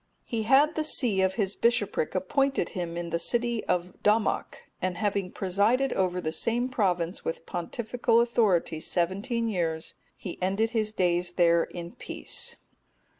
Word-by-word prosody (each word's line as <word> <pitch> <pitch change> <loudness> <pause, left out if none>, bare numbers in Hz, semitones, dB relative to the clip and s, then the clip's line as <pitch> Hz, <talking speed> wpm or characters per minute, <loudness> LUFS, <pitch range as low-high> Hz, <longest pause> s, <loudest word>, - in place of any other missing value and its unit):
He 230 -3 -3
had 290 +4 +6
the 310 - -1
see 240 -10 +2
of 190 0 +1
his 200 -3 -1
bishopric 210 -8 +1
appointed 270 +3 +1
him 170 -2 -4
in 170 -1 -4
the 170 - 0
city 235 +4 0
Dommoc,(250) 200 +5 +1 0.3
and 185 -1 -1
having 200 -2 -1
presided 210 +8 +1
over 180 -1 0
the 155 -3 -2
same 235 +9 0
province 180 -7 0
with 165 - -4
pontifical 230 +6 0
authority 210 -9 +2
seventeen 200 +9 -1
years, 165 -6 -2 0.2
he 180 - -7
ended 195 +5 +1
his 215 -2 0
days 175 -3 0
there 170 -1 +4
in 170 0 -8
peace. - - -3
195 Hz, 145 wpm, -27 LUFS, 175-230 Hz, 0.3 s, had